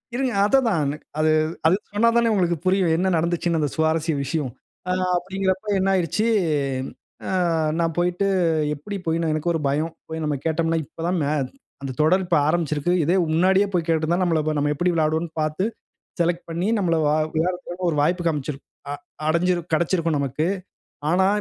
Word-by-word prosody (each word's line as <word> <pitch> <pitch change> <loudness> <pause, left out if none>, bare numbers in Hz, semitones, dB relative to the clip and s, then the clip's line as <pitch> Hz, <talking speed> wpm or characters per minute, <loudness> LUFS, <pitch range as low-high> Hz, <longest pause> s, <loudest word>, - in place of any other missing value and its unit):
இருங்க. 260 0 0
அதா 240 +6 +4
அதான் 225 -9 +1
எனக் 145 +2 -4
அது 155 0 +3 0.4
அது 170 - +5 0.2
சொன்னாதானே 230 +2 +3
உங்களுக்கு 175 -4 +1
புரியும். 185 -1 +3
என்ன 190 +2 +1
நடந்ச்சுன்னு 170 0 0
அந்த 150 -2 0
சுவாரஸ்ய 160 0 +1
விஷயம். 140 0 -2 0.4
ஆ - - +2 0.3
அப்பிடிங்கிறப்ப 190 +2 -2
என்ன 190 +1 +1
ஆயிருச்சு, 180 +4 0 1.0
ஆ - - -2 0.5
நான் 165 -2 0
போயிட்டு 180 +3 +1 0.5
எப்பிடி 200 +8 -6
போயி 165 0 0
எனக்கு 155 +3 0
ஒரு 165 - 0
பயம். 150 +4 0 0.2
போய் 160 0 -4
நம்ம 150 -1 0
கேட்டம்ன்னா, 165 0 +1
இப்ப 165 - -9
தான் 180 +1 +1
மே 140 - 0 0.5
அந்த 135 -1 -4
தொடர் 180 +5 +3
இப்ப 175 -2 +2
ஆரம்பிச்சிருக்கு. 155 0 0
இதே 170 +5 +2 0.2
முன்னாடியே 190 +4 +4
போய் 170 -2 +1
கேட்டிருந்தா 165 +1 +1
நம்மள 165 -3 +2 0.2
நம்ம 145 +1 +1
எப்பிடி 175 +5 +1
விளையாடுவோன்னு 160 0 0
பார்த்து 155 +4 -1 0.6
செலக்ட் 170 0 0
பண்ணி 170 +3 -1
நம்மள 175 -4 +1
வ - - +3 0.3
விளையாடுறதுக்கு 180 +2 -2
ஒரு - - -2
வாய்ப்பு 175 +4 +1
காண்பிச்சுரு 150 -3 -1 0.3
அ - - -2 0.3
அடைஞ்சிரு 175 +2 +2
கெடைச்சிருக்கும் 165 0 +1
நமக்கு. 140 +3 -1 0.6
ஆனா, 185 +4 +3
170 Hz, 165 wpm, -23 LUFS, 155-180 Hz, 1.0 s, அது